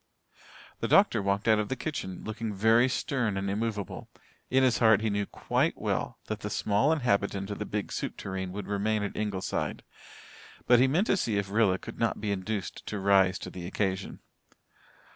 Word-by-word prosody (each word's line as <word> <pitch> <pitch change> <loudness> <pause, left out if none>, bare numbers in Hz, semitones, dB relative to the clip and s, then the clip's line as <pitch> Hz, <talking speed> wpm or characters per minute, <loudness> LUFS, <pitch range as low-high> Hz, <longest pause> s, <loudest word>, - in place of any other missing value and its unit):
The - - -1
doctor - - +4
walked 100 +2 0
out 110 -1 +5
of 105 - -2
the 130 - -1
kitchen, 115 - -5
looking 110 0 -4
very 115 +5 +4
stern 125 -5 -1
and 95 0 -2
immovable. 105 -1 -3 0.4
In 130 +1 +3
his 125 -2 +3
heart 110 -3 +5
he 110 -1 0
knew 100 0 -1
quite - - 0
well - - -2
that - - -4
the - - -5
small 105 +9 +2
inhabitant 100 -8 0
of 105 - -5
the 105 - -4
big 105 -2 -3
soup - - -4
tureen 95 -1 -4
would 100 +2 -5
remain 105 +1 0
at 105 - -4
Ingleside, 105 -3 -2 0.8
but 120 -1 +6
he 130 - +5
meant 165 +10 +2
to 195 - +2
see 110 - 0
if 100 -1 -2
Rilla 105 -3 +3
could 115 - -10
not 115 - 0
be 105 -1 -2
induced 100 -1 -3
to 105 - -3
rise 95 -1 +4
to - - -8
the 90 -1 -7
occasion. 95 0 -2
105 Hz, 190 wpm, -29 LUFS, 100-115 Hz, 0.8 s, but